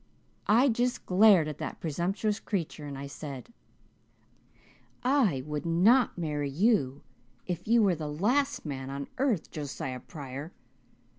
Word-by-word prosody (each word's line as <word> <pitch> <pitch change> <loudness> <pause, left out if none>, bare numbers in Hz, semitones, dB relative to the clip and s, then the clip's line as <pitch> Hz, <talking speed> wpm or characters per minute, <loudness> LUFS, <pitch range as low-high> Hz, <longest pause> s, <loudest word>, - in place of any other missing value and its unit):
"I 235 +6 +5
just 245 0 0
glared 190 -4 +6
at 150 - -6
that - - -5
presumptuous 190 +7 -1
creature 165 -6 -4
and 140 -1 -6
I 140 - -6
said, 140 - -8 1.5
'I 245 - +2
would 150 -1 -3
not 200 +10 +4
marry 150 -4 -2
you 145 - +1 0.4
if 180 +1 -4
you 230 0 +5
were 195 -3 +4
the 155 -2 -4
last 250 - +1
man 135 -3 -5
on 140 0 -5
earth, 250 - 0
Josiah 135 -3 -5
Pryor. 140 +3 -8
170 Hz, 135 wpm, -29 LUFS, 145-220 Hz, 1.5 s, glared